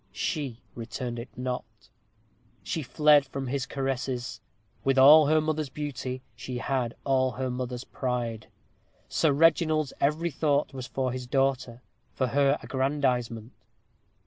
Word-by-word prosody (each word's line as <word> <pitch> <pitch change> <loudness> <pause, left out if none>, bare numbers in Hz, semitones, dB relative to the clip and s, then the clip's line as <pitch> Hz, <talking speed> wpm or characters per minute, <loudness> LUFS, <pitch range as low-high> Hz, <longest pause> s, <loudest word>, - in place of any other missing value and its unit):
She 140 - -2 0.2
returned 120 +1 -5
it 120 +3 -7
not. 125 0 -2 1.0
She 160 - -2
fled 150 +1 +4
from 135 0 -5
his 135 +1 -2
caresses. 130 -4 -3 0.4
With 135 0 +2
all 145 +3 +9
her 155 +1 +4
mother's 155 -2 -1
beauty, 130 -3 -5
she 125 -1 -6
had 120 -1 -1
all 130 -2 +2
her 130 -1 -3
father's 125 0 -4
pride. 120 -5 -3 0.6
Sir 160 - +2
Reginald's 155 -1 +3
every 155 +4 +1
thought 145 0 +1
was 130 -2 -6
for 130 -1 -2
his 125 0 -5
daughter 130 -2 0 0.3
for 130 - +1
her 140 +3 +3
aggrandizement. 130 -4 -1
135 Hz, 130 wpm, -27 LUFS, 125-145 Hz, 1.0 s, all